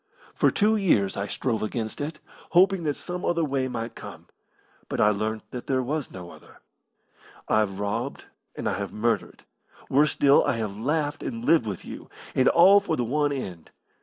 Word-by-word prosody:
For -, -, +3 dB
two 215 Hz, +1 st, +2 dB
years 105 Hz, -, +2 dB
I 100 Hz, +1 st, -3 dB
strove 115 Hz, +3 st, -2 dB
against 110 Hz, +3 st, -3 dB
it, 150 Hz, +2 st, -4 dB, 0.4 s
hoping 185 Hz, -1 st, +4 dB
that 145 Hz, -2 st, 0 dB
some 180 Hz, 0 st, -6 dB
other 170 Hz, -1 st, +1 dB
way 135 Hz, -2 st, -1 dB
might 115 Hz, -2 st, -5 dB
come, -, -, -10 dB, 0.6 s
but -, -, -3 dB
I 105 Hz, -, +5 dB
learnt 110 Hz, +1 st, -2 dB
that 125 Hz, -, -7 dB
there 130 Hz, -1 st, +1 dB
was 145 Hz, +2 st, -3 dB
no 90 Hz, -2 st, -9 dB
other. -, -, -16 dB, 0.9 s
I've 105 Hz, -3 st, +1 dB
robbed 100 Hz, 0 st, -3 dB, 0.3 s
and -, -, -4 dB
I -, -, 0 dB
have -, -, -4 dB
murdered 115 Hz, +2 st, -2 dB, 0.5 s
worse 145 Hz, +3 st, +4 dB
still, 140 Hz, 0 st, +5 dB
I -, -, +1 dB
have 110 Hz, -3 st, -3 dB
laughed 145 Hz, +6 st, -1 dB
and 115 Hz, -1 st, -5 dB
lived 155 Hz, -7 st, +4 dB
with 100 Hz, -4 st, -5 dB
you -, -, -9 dB, 0.2 s
and 130 Hz, -, +3 dB
all 190 Hz, +4 st, +7 dB
for 200 Hz, -5 st, -2 dB
the 125 Hz, -, -1 dB
one 145 Hz, +4 st, +1 dB
end. 95 Hz, -, -6 dB
130 Hz, 185 wpm, -26 LUFS, 110-155 Hz, 0.9 s, all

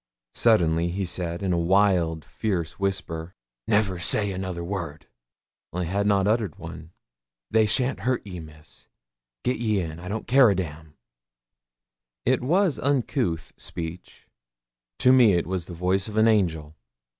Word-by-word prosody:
Suddenly 85 Hz, -7 st, +3 dB
he 95 Hz, +2 st, -2 dB
said, 85 Hz, +1 st, -3 dB
in 95 Hz, -2 st, +1 dB
a 85 Hz, -, +1 dB
wild, 85 Hz, -3 st, +2 dB
fierce 90 Hz, -7 st, -3 dB
whisper 90 Hz, -3 st, -3 dB, 0.3 s
'Never 100 Hz, -4 st, +1 dB
say 100 Hz, +3 st, +3 dB
another 95 Hz, -2 st, -4 dB
word' 85 Hz, -5 st, -5 dB, 0.7 s
(I 90 Hz, +1 st, -2 dB
had 100 Hz, +4 st, -1 dB
not 100 Hz, -2 st, +3 dB
uttered 105 Hz, -2 st, 0 dB
one). 80 Hz, -2 st, -9 dB, 0.6 s
'They 110 Hz, -1 st, +4 dB
shan't 125 Hz, +5 st, 0 dB
hurt 130 Hz, -3 st, -1 dB
ye, 90 Hz, -3 st, -7 dB
Miss; 80 Hz, 0 st, -13 dB, 0.6 s
git 125 Hz, -, 0 dB
ye 110 Hz, -3 st, 0 dB
in; 80 Hz, -2 st, -5 dB
I 90 Hz, -, -9 dB
don't 105 Hz, +3 st, -4 dB
care 130 Hz, -1 st, +6 dB
a 100 Hz, -, +2 dB
damn!' 80 Hz, -3 st, -6 dB, 1.3 s
It -, -, +2 dB
was 170 Hz, +4 st, +2 dB
an -, -, -6 dB
uncouth 125 Hz, -, 0 dB
speech. 85 Hz, +1 st, -7 dB, 0.7 s
To 130 Hz, -, +5 dB
me 120 Hz, -6 st, +6 dB
it 85 Hz, -, +1 dB
was 90 Hz, -2 st, -3 dB
the 90 Hz, -, -8 dB
voice 90 Hz, +2 st, 0 dB
of 110 Hz, 0 st, -6 dB
an 110 Hz, +1 st, +5 dB
angel. 80 Hz, -8 st, +1 dB
95 Hz, 155 wpm, -25 LUFS, 85-110 Hz, 1.3 s, care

